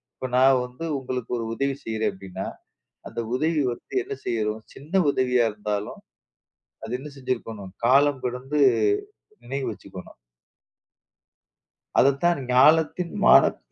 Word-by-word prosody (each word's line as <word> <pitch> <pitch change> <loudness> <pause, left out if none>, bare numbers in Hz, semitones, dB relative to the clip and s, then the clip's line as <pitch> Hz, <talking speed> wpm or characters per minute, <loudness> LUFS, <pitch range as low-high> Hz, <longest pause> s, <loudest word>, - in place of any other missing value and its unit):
இப்போ 130 - -5
நான் 130 0 +5
வந்து 125 +7 -8
உங்களுக்கு 125 -2 -5
ஒரு 115 - -3
உதவி 140 +3 -1
செய்றேன் 110 -1 -1
அப்படின்னா, 95 0 -7 0.6
அந்த - - -6 0.2
உதவி 155 +2 +1
வந்து - - -15
என்ன 410 +2 -6
செய்யிறோம், 110 -1 -1
சின்ன 150 +6 -13 0.2
உதவியா 125 -3 +2
இருந்தாலும், 105 0 -4 0.8
அது 115 - -6
என்ன 150 +2 -8
செஞ்சிருக்கணும்? 115 -7 -4 0.2
காலம் 140 +1 +4
கடந்து 130 +4 -2 0.8
நினைவு 135 +2 -4
வச்சுக்கணும். - - -11 1.9
அதத்தான், 140 +4 +3
ஞாலத்தின் 160 +6 +4
மானப் - - +6
130 Hz, 115 wpm, -24 LUFS, 115-140 Hz, 1.9 s, மானப்